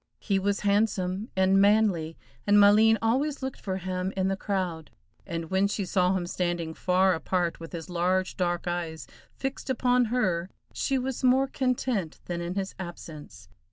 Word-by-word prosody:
He 195 Hz, -2 st, 0 dB
was 200 Hz, +1 st, 0 dB
handsome 200 Hz, 0 st, 0 dB
and 190 Hz, +1 st, +4 dB
manly, 200 Hz, -6 st, +2 dB, 0.3 s
and 205 Hz, 0 st, +5 dB
Maleen 215 Hz, +2 st, +6 dB
always 270 Hz, +5 st, 0 dB
looked 265 Hz, -1 st, -5 dB
for 190 Hz, -2 st, -3 dB
him 185 Hz, 0 st, -3 dB
in 190 Hz, 0 st, +1 dB
the 195 Hz, -, 0 dB
crowd, 185 Hz, -5 st, -3 dB, 0.4 s
and 165 Hz, -2 st, -5 dB
when 190 Hz, +1 st, +3 dB
she 200 Hz, -1 st, -2 dB
saw 180 Hz, +1 st, +2 dB
him 175 Hz, -, -3 dB
standing 175 Hz, -2 st, -2 dB
far 185 Hz, +2 st, +2 dB
apart 175 Hz, 0 st, -1 dB
with 165 Hz, 0 st, -9 dB
his 165 Hz, -2 st, -6 dB
large 185 Hz, +1 st, 0 dB
dark 175 Hz, -1 st, -1 dB
eyes 170 Hz, -2 st, -3 dB, 0.3 s
fixed 270 Hz, 0 st, -5 dB
upon 250 Hz, -1 st, +2 dB
her, 190 Hz, -7 st, 0 dB, 0.2 s
she 270 Hz, -, 0 dB
was 260 Hz, 0 st, -3 dB
more 260 Hz, +1 st, +4 dB
content 255 Hz, -, -2 dB
than 175 Hz, -1 st, -4 dB
in 175 Hz, +2 st, -4 dB
his 195 Hz, -1 st, -3 dB
absence. 170 Hz, -4 st, -9 dB
190 Hz, 165 wpm, -27 LUFS, 175-220 Hz, 0.4 s, Maleen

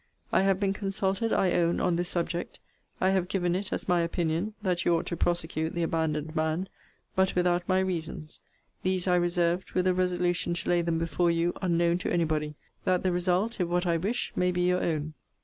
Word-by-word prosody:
I -, -, +5 dB
have 195 Hz, -1 st, +2 dB
been 195 Hz, -1 st, +1 dB
consulted, 195 Hz, +2 st, -1 dB
I 185 Hz, -, +2 dB
own, 170 Hz, 0 st, +2 dB
on 180 Hz, -2 st, +1 dB
this 175 Hz, +1 st, -1 dB
subject. 175 Hz, 0 st, -3 dB, 0.4 s
I 190 Hz, -, +3 dB
have 190 Hz, -2 st, +1 dB
given 180 Hz, -2 st, 0 dB
it 190 Hz, +1 st, -3 dB
as -, -, -3 dB
my 175 Hz, -1 st, +3 dB
opinion, 170 Hz, +4 st, -1 dB
that 180 Hz, -3 st, 0 dB
you 170 Hz, -, +3 dB
ought 165 Hz, -, -1 dB
to 170 Hz, -, -3 dB
prosecute 160 Hz, -2 st, -1 dB
the 170 Hz, -, 0 dB
abandoned 160 Hz, -1 st, -1 dB
man 160 Hz, +4 st, 0 dB, 0.5 s
but 190 Hz, 0 st, +2 dB
without 175 Hz, 0 st, +1 dB
my 185 Hz, -, +4 dB
reasons. 165 Hz, -4 st, -4 dB, 0.4 s
These 185 Hz, 0 st, 0 dB
I 180 Hz, -, +4 dB
reserved, 175 Hz, 0 st, +1 dB
with 185 Hz, 0 st, +1 dB
a 185 Hz, -, +4 dB
resolution 180 Hz, -1 st, 0 dB
to 170 Hz, -, -4 dB
lay 175 Hz, -1 st, +3 dB
them 170 Hz, -1 st, 0 dB
before 165 Hz, +1 st, +1 dB
you 170 Hz, +1 st, +1 dB
unknown 170 Hz, -1 st, +2 dB
to -, -, -3 dB
any 175 Hz, -1 st, +2 dB
body, 150 Hz, -1 st, -2 dB, 0.3 s
that 185 Hz, -1 st, +1 dB
the 185 Hz, -, +2 dB
result, 180 Hz, +6 st, 0 dB
if 180 Hz, -, +1 dB
what 175 Hz, +1 st, 0 dB
I 170 Hz, -1 st, +2 dB
wish, 205 Hz, +9 st, -2 dB
may 180 Hz, 0 st, +2 dB
be 180 Hz, 0 st, -1 dB
your 180 Hz, 0 st, +2 dB
own. 155 Hz, -2 st, -1 dB
175 Hz, 210 wpm, -28 LUFS, 170-185 Hz, 0.5 s, I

